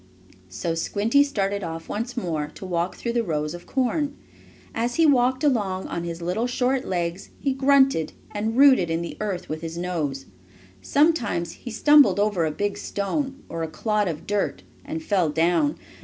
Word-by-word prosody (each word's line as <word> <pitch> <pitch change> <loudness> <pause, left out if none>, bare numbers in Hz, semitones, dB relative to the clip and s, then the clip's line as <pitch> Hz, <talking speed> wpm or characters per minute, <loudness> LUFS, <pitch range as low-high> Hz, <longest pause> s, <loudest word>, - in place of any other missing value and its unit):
So 165 - -3
Squinty 210 +10 +2
started 200 -7 -1
off 165 0 -6
once 240 +4 -4
more 160 -9 -2
to - - -8
walk 175 0 -1
through 235 - -3
the 235 - +2
rows 150 -4 -2
of 175 - -10
corn. 285 +3 0 0.6
As 240 +2 -1
he 330 - +4
walked 260 -2 +3
along 205 -10 +1
on 170 0 -3
his 170 0 -5
little 185 +8 0
short 255 +1 0
legs 175 0 -3
he 275 -1 0
grunted, 270 - +3 0.2
and 220 +3 -2
rooted 260 -11 +6
in 165 +1 -1
the 170 - -6
earth 200 -4 -3
with 155 +1 -5
his 165 0 -6
nose. 155 -7 -3 0.6
Sometimes 285 - +1
he 245 - -9
stumbled 290 +1 +5
over 205 -5 +2
a 155 - 0
big 205 +6 -2
stone, 270 +7 -3
or 165 - -5
a 160 - -1
clod 210 +6 0
of 160 -1 -4
dirt, 205 -1 -1 0.2
and 315 +3 -5
fell 190 - +1
down. 170 - +2
205 Hz, 175 wpm, -24 LUFS, 170-260 Hz, 0.6 s, rooted